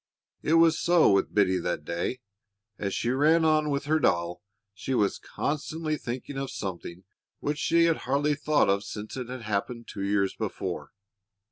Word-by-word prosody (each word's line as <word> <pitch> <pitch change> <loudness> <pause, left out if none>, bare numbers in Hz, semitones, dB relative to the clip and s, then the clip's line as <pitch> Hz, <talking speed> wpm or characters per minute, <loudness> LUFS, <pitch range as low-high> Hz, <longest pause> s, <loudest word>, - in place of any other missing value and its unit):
It 160 - +2
was 165 -1 +5
so 175 -7 +5
with 100 0 +2
Biddy 95 -3 +3
that 85 -3 -3
day. 85 +10 -3 0.6
As 100 -1 -2
she 120 - 0
ran 155 +5 +4
on 155 -1 +3
with 140 0 -1
her 155 +2 +2
doll 85 - +1 0.3
she 110 +6 -3
was 105 -4 +1
constantly 155 +1 -3
thinking 130 +1 -5
of 135 -1 -3
something 90 -2 -6 0.4
which 145 0 -2
she 170 +1 +3
had 165 -1 +2
hardly 145 +2 +1
thought 150 +1 +2
of 100 +1 +2
since 105 +1 -7
it 125 -2 -5
had 125 -2 -6
happened 110 +3 -3
two 100 - -7
years 100 -1 +1
before. - - -4
130 Hz, 170 wpm, -27 LUFS, 100-150 Hz, 0.6 s, was